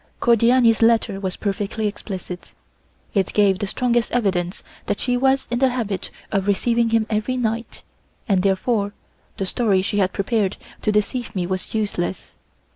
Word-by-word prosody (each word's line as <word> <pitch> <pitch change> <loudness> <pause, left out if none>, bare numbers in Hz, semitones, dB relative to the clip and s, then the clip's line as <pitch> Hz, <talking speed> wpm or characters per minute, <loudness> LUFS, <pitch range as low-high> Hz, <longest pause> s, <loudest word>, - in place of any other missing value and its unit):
Cordiani's 235 0 +4
letter 225 -4 +3
was 190 -2 -3
perfectly 205 +2 -2
explicit; 190 -3 -6 0.6
it 195 -2 +1
gave 200 -3 +3
the 205 - -2
strongest 240 +2 +1
evidence 190 -6 0 0.2
that - - -1
she 250 0 0
was 265 +1 +2
in 240 - 0
the 265 0 +4
habit 225 -6 -3 0.2
of 195 -1 0
receiving 230 +3 +2
him 225 -1 +2
every 215 +4 -1
night, 230 -1 -3 0.4
and 195 -4 +3
therefore 200 +2 +1 0.4
the 195 - -1
story 195 -1 +1
she 205 +1 0
had 190 -1 +2
prepared 200 -1 0 0.2
to 215 - +1
deceive 210 +3 -1
me 180 -2 0
was 185 +4 -4
useless. 200 -4 -2
210 Hz, 155 wpm, -22 LUFS, 195-235 Hz, 0.6 s, Cordiani's